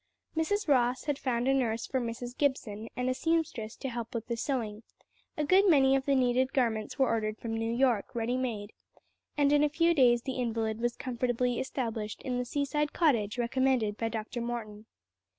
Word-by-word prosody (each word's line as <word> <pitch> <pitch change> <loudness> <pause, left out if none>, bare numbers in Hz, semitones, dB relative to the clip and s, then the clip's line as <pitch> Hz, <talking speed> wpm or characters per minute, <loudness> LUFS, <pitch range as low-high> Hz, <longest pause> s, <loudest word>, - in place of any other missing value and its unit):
Mrs. 410 +6 0
Ross 255 -3 +2
had 290 -2 -2
found 245 -1 -1
a 270 - +4
nurse 235 -4 0
for 260 - -1
Mrs. 240 +1 -5
Gibson 225 -7 -1
and 250 +1 -1
a 255 - +2
seamstress 305 -8 -1
to 270 - -5
help 235 -1 -5
with 230 -1 -3
the 235 - -2
sewing; 225 -4 -2 0.6
a 300 - 0
good 375 +6 +5
many 270 -4 +5
of 270 -1 0
the 280 - +4
needed 255 +1 +2
garments 225 -5 0
were 265 -2 +3
ordered 215 -1 -1
from 225 0 -5
New 225 0 -1
York 240 -3 +1
ready 235 +1 0
made, 225 -5 -3 0.6
and 285 0 +4
in 295 0 +5
a 300 - +3
few 335 +3 +3
days 240 -5 +4
the 265 -1 -4
invalid 225 -2 -1
was 240 0 0
comfortably 245 -1 -1
established 225 -5 -4
in 250 -1 -2
the 250 - -2
seaside 290 +3 -1
cottage 235 -10 +2
recommended 245 -3 +1
by 225 +1 -2
Dr. 225 +2 -4
Morton. 220 -3 -5
245 Hz, 190 wpm, -30 LUFS, 225-270 Hz, 0.6 s, good